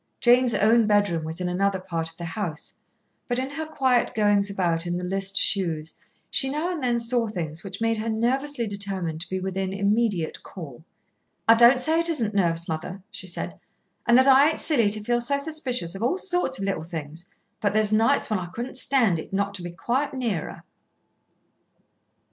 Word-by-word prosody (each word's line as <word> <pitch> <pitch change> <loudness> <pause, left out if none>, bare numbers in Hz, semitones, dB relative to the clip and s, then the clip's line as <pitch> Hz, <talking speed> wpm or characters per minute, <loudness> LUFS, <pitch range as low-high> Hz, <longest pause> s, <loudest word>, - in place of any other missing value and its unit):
Jane's 245 -1 +4
own 225 +1 +4
bedroom 205 -6 +2
was 160 +2 -4
in 180 - -2
another 190 +2 0
part 165 -3 -4
of 165 - -19
the 170 - -6
house, 165 -2 -5 0.5
but 245 - -1
in 260 +2 -2
her 315 +2 -5
quiet 260 -5 +1
goings 205 -2 +2
about 175 -3 -1
in 175 0 -1
the 180 - -5
list 195 +2 0
shoes 165 -7 0 0.4
she 270 - 0
now 305 +6 -2
and 330 -6 -4
then 240 -1 +1
saw 235 0 +2
things 170 -6 -5
which 195 -1 -7
made 225 0 +1
her 220 +1 -3
nervously 245 +4 0
determined 195 -6 -4
to - - -6
be 190 - -2
within 190 0 -3
immediate 200 -3 0
call. 160 -6 -10 0.6
"I 225 - +9
don't 240 +2 +6
say 320 +5 +2
it 335 0 +2
isn't 230 -10 0
nerves, 170 -4 +1
mother," 180 +4 -5
she 215 -4 -6
said, 85 - -5 0.5
"and 240 - +6
that 260 - +6
I 275 +2 +6
ain't 320 - -2
silly 235 -10 +3
to 210 0 -3
feel 240 +2 +1
so 280 +4 +2
suspicious 270 - 0
of 195 - -7
all 250 +11 +1
sorts 355 -8 0
of 195 - -5
little 195 -5 -2
things, 160 0 -7 0.3
but 205 - +1
there's 215 0 +2
nights 225 +1 +3
when 215 -3 -1
I 175 - -6
couldn't 245 +2 -6
stand 245 -10 +3
it - - -9
not 200 +1 -1
to 195 - -4
be 175 - -5
quite 255 - -2
near 225 -11 -2
her." - - -13
205 Hz, 200 wpm, -25 LUFS, 180-245 Hz, 0.6 s, I